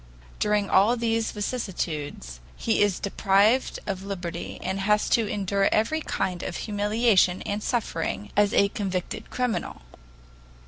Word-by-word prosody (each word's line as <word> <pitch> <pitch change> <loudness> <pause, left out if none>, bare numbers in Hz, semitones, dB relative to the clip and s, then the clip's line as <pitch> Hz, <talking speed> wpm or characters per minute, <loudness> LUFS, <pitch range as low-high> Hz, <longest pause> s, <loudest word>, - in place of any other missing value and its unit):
During 210 -1 +1
all 210 +7 +4
these 230 -1 0
vicissitudes 165 - -4 0.2
he - - +1
is 205 -3 +2
deprived 205 +5 +2
of 190 -2 -3
liberty 180 -3 -5
and 190 +1 -2
has 210 +2 +2
to 230 -2 +3
endure 200 -1 +1
every 230 +9 +1
kind 180 - -2
of - - -4
humiliation 210 -3 +2
and 205 -1 -3
suffering 210 -3 -2
as 205 0 +4
a 200 - +4
convicted 190 -3 -4
criminal. 235 - -2
205 Hz, 130 wpm, -26 LUFS, 190-220 Hz, 0.2 s, all